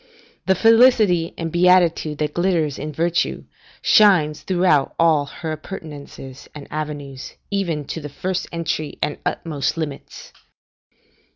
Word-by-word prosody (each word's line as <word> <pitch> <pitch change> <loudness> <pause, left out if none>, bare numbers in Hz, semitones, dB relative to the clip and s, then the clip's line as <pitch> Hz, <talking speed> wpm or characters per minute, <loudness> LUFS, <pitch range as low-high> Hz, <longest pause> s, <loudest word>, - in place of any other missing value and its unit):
The 190 - +4
felicity 225 -6 +4
and 165 -1 -4
beatitude 175 -3 +3
that 150 0 -2
glitters 170 -5 0
in 155 +1 -5
Virtue, 170 +3 -1 0.4
shines 180 -9 +4
throughout 180 -6 +1
all 155 -4 +3
her 160 +2 -6
appurtenances 150 -5 -9
and 145 -2 -9
avenues, 145 -3 -6 0.2
even 170 -7 -1
to 165 - -6
the 145 - -7
first 185 +5 -3
entry 165 -2 -3
and 150 - -2
utmost 145 -2 -2
limits. 150 -4 -7
160 Hz, 120 wpm, -21 LUFS, 150-180 Hz, 0.4 s, The